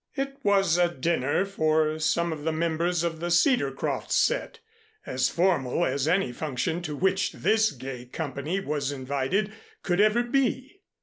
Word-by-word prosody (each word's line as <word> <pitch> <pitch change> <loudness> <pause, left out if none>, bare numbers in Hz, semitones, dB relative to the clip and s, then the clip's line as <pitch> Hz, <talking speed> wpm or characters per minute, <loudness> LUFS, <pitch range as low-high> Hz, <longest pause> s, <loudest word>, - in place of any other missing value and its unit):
It 275 0 -3
was 195 -6 +3
a 175 -1 +4
dinner 155 +2 0
for 155 -4 +1
some 170 +1 +1
of 150 -2 -8
the 160 - 0
members 170 +2 0
of 165 -2 -2
the 175 +1 -3
Cedarcroft 175 - +1
set, - - +1 0.5
as 130 0 0
formal 170 -4 +1
as 140 +2 -1
any 180 -5 +2
function 150 +5 -2
to 155 -4 -5
which 190 +4 +1
this 220 0 +2
gay 130 -1 -8
company 145 +6 -3
was 145 -6 -2
invited, 140 +9 -1 0.3
could 180 +1 +1
ever 215 +3 +3
be. 270 +7 -1
170 Hz, 150 wpm, -26 LUFS, 145-195 Hz, 0.5 s, a